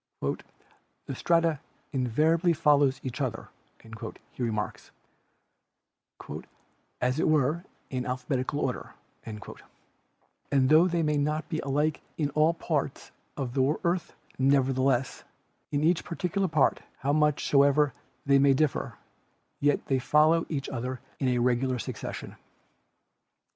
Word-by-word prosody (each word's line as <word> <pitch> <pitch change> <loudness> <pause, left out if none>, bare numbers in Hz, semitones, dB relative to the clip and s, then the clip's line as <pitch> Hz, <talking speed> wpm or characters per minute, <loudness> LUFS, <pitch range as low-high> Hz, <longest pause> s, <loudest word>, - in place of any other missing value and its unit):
"The - - -5
strata 165 +1 +2 0.3
invariably 155 +7 +2
fol 150 -2 +4
low 145 -2 +5
each 130 +2 -4
other," 120 -5 -3 0.8
he - - -9
remarks, 105 -5 -3 2.1
"as 125 +3 0
it - - +2
were, 155 +2 +2 0.3
in 130 -1 -2
alphabetical 130 +2 -2
order," 125 - -3 0.3
and 105 -1 -7 1.3
tho 160 +4 +6
they 170 -2 0
may 150 -1 +1
not 150 +2 -1
be 155 - -2
alike 145 +2 0 0.2
in 145 -3 0
all 155 +3 +3
parts 150 -4 -3 0.3
of 130 -4 -3
the 135 +3 +2
earth, 175 -1 -1 0.2
nevertheless 130 -1 +2 0.5
"in 145 0 0
each 170 +1 +3
particular 185 +3 -1
part, 155 -4 +2 0.2
how 140 +1 0
much 150 -1 +2
soever 140 0 +4 0.3
they 140 0 +5
may 135 0 +5
differ, 150 0 0 0.6
yet 145 0 +1
they 135 -1 +1
follow 155 +5 +3
each 140 -4 -3
other 130 0 -4 0.2
in 135 - 0
a 125 -1 +2
regular 125 +1 +1
succession." - - -6
140 Hz, 120 wpm, -28 LUFS, 130-155 Hz, 2.1 s, tho